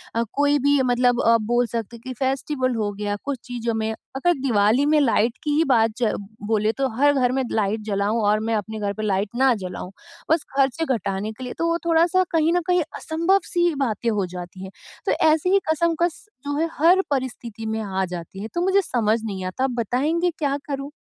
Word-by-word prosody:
अ, 230 Hz, -, +2 dB
कोई 290 Hz, 0 st, +2 dB
भी 285 Hz, 0 st, +3 dB
मतलब 245 Hz, 0 st, +2 dB
अ, 230 Hz, 0 st, +5 dB
बोल 240 Hz, +3 st, +1 dB
सकते 230 Hz, 0 st, -4 dB
है 230 Hz, -, -19 dB
कि 255 Hz, -, -4 dB
फेस्टिवल 265 Hz, -1 st, -1 dB
हो 210 Hz, -2 st, -1 dB
गया, 205 Hz, 0 st, -3 dB
कुछ 280 Hz, -3 st, -3 dB
चीज़ों 235 Hz, -2 st, -3 dB
में 220 Hz, 0 st, -1 dB, 0.2 s
अगर 350 Hz, +6 st, +2 dB
दिवाली 235 Hz, +1 st, +3 dB
में 305 Hz, +1 st, +4 dB
लाइट 230 Hz, -3 st, +2 dB
की 300 Hz, -, -1 dB
ही 315 Hz, -, +4 dB
बात 225 Hz, -3 st, +4 dB
च 235 Hz, -3 st, +1 dB, 0.4 s
बोले 215 Hz, 0 st, +2 dB
तो 270 Hz, -1 st, +1 dB
हर 290 Hz, +2 st, +4 dB
घर 255 Hz, -3 st, +2 dB
में 265 Hz, -, 0 dB
लाइट 215 Hz, 0 st, 0 dB
जलाऊँ 205 Hz, +2 st, 0 dB
और 210 Hz, +1 st, +3 dB
मैं 225 Hz, +1 st, -2 dB
अपने 215 Hz, +1 st, -4 dB
घर 200 Hz, -1 st, -1 dB
पे 215 Hz, -, -5 dB
लाइट 200 Hz, 0 st, 0 dB
ना 260 Hz, 0 st, +4 dB
जलाऊँ, 185 Hz, -2 st, -6 dB, 0.4 s
बस 320 Hz, -2 st, +3 dB
खर्चे 275 Hz, +3 st, +2 dB
घटाने 200 Hz, +1 st, -3 dB
के 255 Hz, +4 st, -10 dB
लिए 250 Hz, -, -5 dB
तो 335 Hz, -, 0 dB
वो 335 Hz, -, +1 dB
थोड़ा-सा 340 Hz, +3 st, +3 dB
कहीं 325 Hz, 0 st, +2 dB
न 355 Hz, -, +2 dB
कहीं 360 Hz, -1 st, +3 dB, 0.2 s
असंभव 335 Hz, +5 st, +1 dB
सी 345 Hz, -3 st, +1 dB
बातें 235 Hz, -4 st, -1 dB
हो 205 Hz, -3 st, 0 dB
जाती 180 Hz, +1 st, -8 dB
हैं। 190 Hz, -, -8 dB, 0.3 s
तो -, -, +2 dB, 0.2 s
ऐसी 315 Hz, +3 st, +3 dB
ही 395 Hz, -, +6 dB
कशमकश 335 Hz, +1 st, 0 dB, 0.2 s
जो 285 Hz, 0 st, -1 dB
है 330 Hz, -, +1 dB
हर 355 Hz, +4 st, +5 dB
परिस्थिति 235 Hz, -4 st, -3 dB
में 220 Hz, 0 st, -2 dB
आ 190 Hz, -2 st, -1 dB
जाती 175 Hz, +1 st, -7 dB
है, 215 Hz, -, -4 dB
तो 345 Hz, -, -1 dB
मुझे 385 Hz, +2 st, +3 dB
समझ 225 Hz, -, +1 dB
नहीं 195 Hz, -4 st, -4 dB
आता 185 Hz, +8 st, -3 dB
आप 265 Hz, -, +1 dB
बताएँगे 300 Hz, -, 0 dB
क्या 285 Hz, -2 st, 0 dB
करूँ? 280 Hz, 0 st, -5 dB
245 Hz, 215 wpm, -23 LUFS, 215-295 Hz, 0.4 s, ही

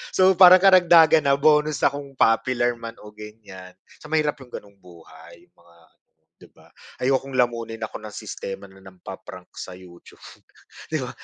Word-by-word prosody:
So, 185 Hz, 0 st, +4 dB
parang 185 Hz, 0 st, +8 dB
karagdagan 170 Hz, -5 st, +5 dB
na, 140 Hz, -, +3 dB
bonus 150 Hz, +1 st, +1 dB
na -, -, +3 dB
kung 140 Hz, -1 st, -10 dB
popular 120 Hz, +1 st, +1 dB
man 115 Hz, 0 st, -9 dB
o 105 Hz, -, -13 dB
ganyan. 105 Hz, -4 st, -13 dB, 0.2 s
Sa -, -, -14 dB
mahirap 150 Hz, -2 st, -1 dB
'yong 130 Hz, -, -14 dB
ganong 100 Hz, -3 st, -12 dB
buhay, 85 Hz, -1 st, -17 dB
'yong -, -, -30 dB
mga 85 Hz, 0 st, -25 dB, 0.2 s
ano, -, -, -46 dB, 0.3 s
'di -, -, -17 dB
ba? -, -, -23 dB, 0.3 s
Ayokong 135 Hz, +1 st, -1 dB
lamunin 115 Hz, -2 st, -2 dB
ako 110 Hz, -, -7 dB
ng 105 Hz, -1 st, -11 dB
sistema 95 Hz, 0 st, -8 dB
na 95 Hz, -1 st, -16 dB
nang-pa-prank 90 Hz, -1 st, -13 dB
sa 90 Hz, -, -9 dB
YouTube, 90 Hz, -1 st, -17 dB, 0.7 s
'di -, -, -1 dB
ba? -, -, -6 dB
115 Hz, 170 wpm, -22 LUFS, 95-150 Hz, 0.7 s, parang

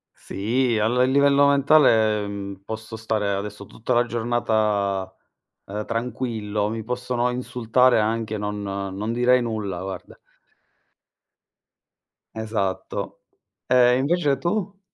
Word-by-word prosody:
Sì, 120 Hz, +4 st, -1 dB
al 125 Hz, +4 st, +2 dB
livello 140 Hz, +1 st, +4 dB
mentale, 130 Hz, -7 st, +4 dB
mhmm, 100 Hz, -1 st, -6 dB
posso 110 Hz, +2 st, -7 dB
stare 110 Hz, -2 st, -1 dB
adesso 100 Hz, +1 st, -4 dB
tutta 115 Hz, +5 st, -3 dB
la 120 Hz, 0 st, +3 dB
giornata, 105 Hz, -5 st, 0 dB, 0.5 s
ehm, 105 Hz, +2 st, -5 dB
tranquillo, 115 Hz, -3 st, -2 dB
mi 110 Hz, 0 st, -4 dB
possono 125 Hz, +1 st, -1 dB
insultare 125 Hz, 0 st, +2 dB
anche, 110 Hz, 0 st, -1 dB
non 105 Hz, 0 st, -4 dB
non 100 Hz, +2 st, -4 dB
direi 125 Hz, +1 st, +3 dB
nulla, 105 Hz, -6 st, -3 dB
guarda. 95 Hz, 0 st, -7 dB, 2.2 s
Esatto. 110 Hz, -4 st, -3 dB, 0.5 s
Ehm, 125 Hz, -1 st, +5 dB
invece 145 Hz, -1 st, +1 dB
tu? 195 Hz, +6 st, -2 dB
115 Hz, 105 wpm, -23 LUFS, 105-125 Hz, 2.2 s, Ehm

